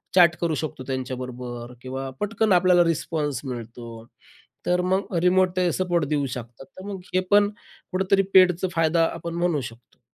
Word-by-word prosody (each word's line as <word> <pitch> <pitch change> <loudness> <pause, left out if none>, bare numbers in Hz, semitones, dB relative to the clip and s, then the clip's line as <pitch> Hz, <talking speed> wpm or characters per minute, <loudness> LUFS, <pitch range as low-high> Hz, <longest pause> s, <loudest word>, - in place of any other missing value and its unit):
Chat 175 -3 +6
करू 165 -2 +1
शकतो 150 -3 -5
त्यांच्याबरोबर 125 -2 -5
किंवा 130 +1 -5
पटकन 215 +1 0
आपल्याला 180 0 +5
रिस्पॉन्स 150 -5 -1
मिळतो, 115 -2 -8 0.6
तर 180 0 +2
मग 190 0 0
रिमोट 185 0 +3
ते 180 -1 +2
सपोर्ट 175 -4 0
देऊ 145 -1 0
शकतात. 120 +2 -10
तर 185 +7 -14
मग 195 - -5
हे 185 - +4
पण 205 0 +5 0.4
कुठेतरी 190 +1 +2
पेडचं 185 -1 +5
फायदा 165 0 +3
आपण 170 0 -6
म्हणू 170 -4 0
शकतो. 120 0 -11
165 Hz, 155 wpm, -24 LUFS, 130-180 Hz, 0.6 s, Chat